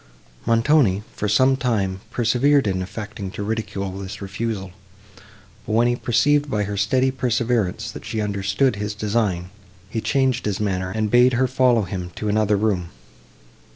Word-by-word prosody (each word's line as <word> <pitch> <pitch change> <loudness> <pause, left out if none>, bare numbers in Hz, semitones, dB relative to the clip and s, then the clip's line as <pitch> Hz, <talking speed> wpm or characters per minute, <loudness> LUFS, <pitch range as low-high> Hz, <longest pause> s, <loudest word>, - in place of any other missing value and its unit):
Montoni, 115 -3 +3
for 105 - -2
some 130 +6 +4
time, 100 -8 -1
persevered 125 +4 +2
in 95 -2 0
affecting 100 +1 -6
to 100 - -4
ridicule 100 -3 -3
this 95 -1 -7
refusal; 100 -1 -4 1.0
but, 110 - -2
when 115 +2 +4
he 120 - +2
perceived 145 +5 +2
by 105 -4 0
her 100 0 -4
steady 130 +6 +2
perseverance, 115 -5 -1
that - - -9
she 110 - -4
understood 100 +3 0
his 105 0 -3
design, 105 -4 -1 0.4
he 110 - -2
changed 130 -3 +1
his 100 -2 -1
manner, 95 -3 -1
and 110 +1 -2
bade 125 +1 +5
her 130 +2 +2
follow 125 -3 +3
him 90 -1 -5
to 105 - -3
another 105 0 +2
room. 100 -5 0
110 Hz, 155 wpm, -22 LUFS, 100-120 Hz, 1.0 s, bade